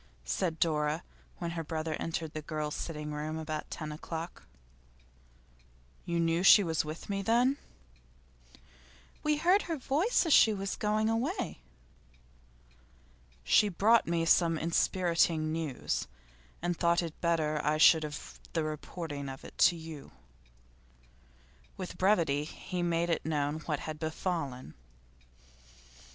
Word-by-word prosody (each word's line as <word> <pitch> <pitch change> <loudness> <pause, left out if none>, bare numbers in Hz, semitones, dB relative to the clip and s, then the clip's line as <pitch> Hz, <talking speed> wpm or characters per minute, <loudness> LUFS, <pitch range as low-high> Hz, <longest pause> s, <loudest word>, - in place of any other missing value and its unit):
said 65 - -1
Dora, 155 0 +1 0.3
when 170 -1 -4
her 165 -1 -4
brother 160 0 -3
entered 160 -1 -3
the 155 - -4
girls' 150 -1 -3
sitting 150 -2 -5
room 155 +1 -3
about 155 -1 -4
ten 155 -2 -5
o'clock. 165 +2 -7 1.6
'You 170 -2 -1
knew 165 +1 +2
she 200 +2 +8
was 160 -3 0
with 155 +1 -7
me, 195 -1 -2
then?' 240 +6 +3 1.6
'We 300 0 +1
heard 360 +6 +4
her 325 - -1
voice 310 - +1
as 325 - +3
she 220 -2 +6
was 195 -1 -3
going 215 +1 0
away.' 240 - -1 1.8
'She 210 - +4
brought 215 +6 +3
me 165 -1 +1
some 165 -1 +4
enspiriting 165 -1 +1
news, 160 -5 -2 0.6
and 175 0 0
thought 170 +1 +2
it 165 -2 -7
better 155 -3 +1
I 150 +1 +1
should 160 +1 +7
have 150 -2 -7
the 165 - 0
reporting 155 -2 -5
of 135 0 -9
it - - -11
to 175 - -5
you.' 160 - -9 1.6
With 180 -1 -7
brevity 170 -7 +3
he 180 +2 -5
made 170 -1 0
known 150 -1 -1
what 150 -3 -1
had 155 -1 -6
befallen. 155 - -3
165 Hz, 130 wpm, -31 LUFS, 155-185 Hz, 1.8 s, she